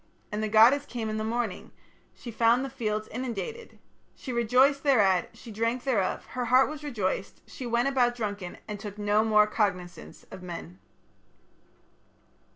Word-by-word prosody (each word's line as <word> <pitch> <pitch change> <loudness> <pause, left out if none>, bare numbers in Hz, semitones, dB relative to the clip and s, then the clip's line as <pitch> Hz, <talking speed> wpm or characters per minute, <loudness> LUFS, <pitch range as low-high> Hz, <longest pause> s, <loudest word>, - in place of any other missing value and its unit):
"And 210 +1 -2
the 215 - -1
goddess 240 +7 +5
came 230 -3 -4
in 215 - -3
the 215 - -2
morning; 230 -2 -3 0.4
she 235 - -9
found 235 +3 +3
the 270 - -7
fields 215 -5 -3
inundated, 260 - -6 0.4
she 255 - -7
rejoiced 250 +4 +3
thereat, 200 - +3
she 235 - -11
drank 230 +4 -1
thereof, 220 -9 0
her 250 -1 -3
heart 255 +3 +4
was 300 -1 -8
rejoiced, 205 -9 -3
she 255 - -7
went 235 +2 +1
about 250 -3 +2
drunken 205 -6 -5
and 210 -1 -6
took 205 0 -8
no 210 +1 +2
more 215 -1 +5
cognizance 180 -5 -3
of - - -9
men." 180 0 -8
230 Hz, 160 wpm, -27 LUFS, 210-255 Hz, 0.4 s, goddess